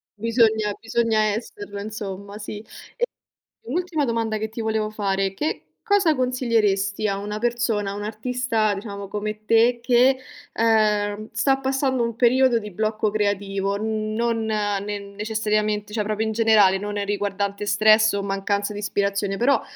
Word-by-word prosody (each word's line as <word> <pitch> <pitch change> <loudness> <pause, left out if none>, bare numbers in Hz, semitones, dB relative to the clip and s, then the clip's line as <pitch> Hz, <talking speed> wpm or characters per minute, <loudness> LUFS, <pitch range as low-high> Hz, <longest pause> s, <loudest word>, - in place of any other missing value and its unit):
Bisogna 220 -1 +2
bisogna 230 -1 +1
esserlo, 205 -2 -6
insomma, 200 -1 -6
sì. 210 0 -6 0.4
E 485 - +1 0.6
un 250 - -4
ultima 345 -5 0
domanda 225 -2 -1
che 220 0 -3
ti 225 +1 -6
volevo 220 -1 -1
fare: 195 -2 -1
che 300 +10 -3 0.2
cosa 400 -8 +3
consiglieresti 220 -5 +1
a 195 -1 -1
una 210 +1 -4
persona, 235 -4 0
a - - -5
un 205 - -5
artista, 225 -1 -1
diciamo, 200 -1 -6
come 215 +1 -4
te, 235 +2 +4
che, 255 +2 +4 0.4
uhm, 215 -2 +1
sta 270 +5 +2
passando 265 -1 0
un 230 -1 -2
periodo 250 0 +4
di 210 -2 -5
blocco 215 +1 -1
creativo, 200 -1 -1
uhm, 215 0 -2
non 230 -1 0
ne 205 -1 -1
necessariamente, 210 0 -2
cioè 215 - 0
proprio 215 +1 -1
in 220 - -1
generale, 215 -4 +5
non 205 +1 -4
è 205 - -1
riguardante 200 0 -2
stress 215 +1 +5
o 200 0 -1
mancanza 200 +1 -1
di 205 - -6
ispirazione. 200 -1 -1
Però 270 +4 +3
215 Hz, 155 wpm, -23 LUFS, 205-230 Hz, 0.6 s, generale